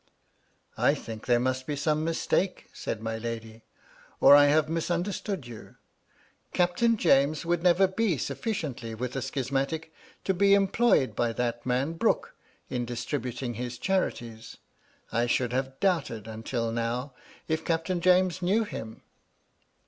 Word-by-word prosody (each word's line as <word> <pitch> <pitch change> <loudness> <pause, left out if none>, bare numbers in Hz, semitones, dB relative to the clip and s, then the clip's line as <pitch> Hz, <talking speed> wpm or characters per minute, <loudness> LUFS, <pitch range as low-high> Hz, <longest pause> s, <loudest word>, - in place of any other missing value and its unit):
^^I - - +3
think 110 0 -8
there 120 -1 +4
must 130 +1 -1
be 150 - -1
some 150 +2 0
mistake/' 165 +3 0
said 110 - -5
my 115 0 -3
lady, 115 -1 -6 0.6
"or 145 - +9
I 145 0 +8
have 150 +1 +3
misunderstood 175 - -2
you. 120 -3 -11 0.8
Captain 185 +6 +2
James 155 -2 +3
would 170 0 +1
never 180 +2 +5
be 190 -3 0
suflSciently 130 - -4
with 125 +2 -4
a 135 - -1
schismatic 135 +4 -2 0.3
to 190 - +1
be 200 +2 +5
employed 200 - +3
by 120 -1 0
that 120 0 -2
man 130 +5 0
Brooke 165 - 0 0.3
in 125 -1 -2
distributing 125 +1 -3
his 125 +1 -5
charities. 120 - -2 0.5
I 120 +1 +1
should 125 0 0
have 130 +1 -2
doubted, 145 - 0
until 115 +1 -3
now, 120 +4 -2 0.3
if 160 0 -1
Captain 170 +2 -1
James 185 0 +3
knew 200 +6 +2
him." 110 - -8
140 Hz, 140 wpm, -28 LUFS, 120-175 Hz, 0.8 s, or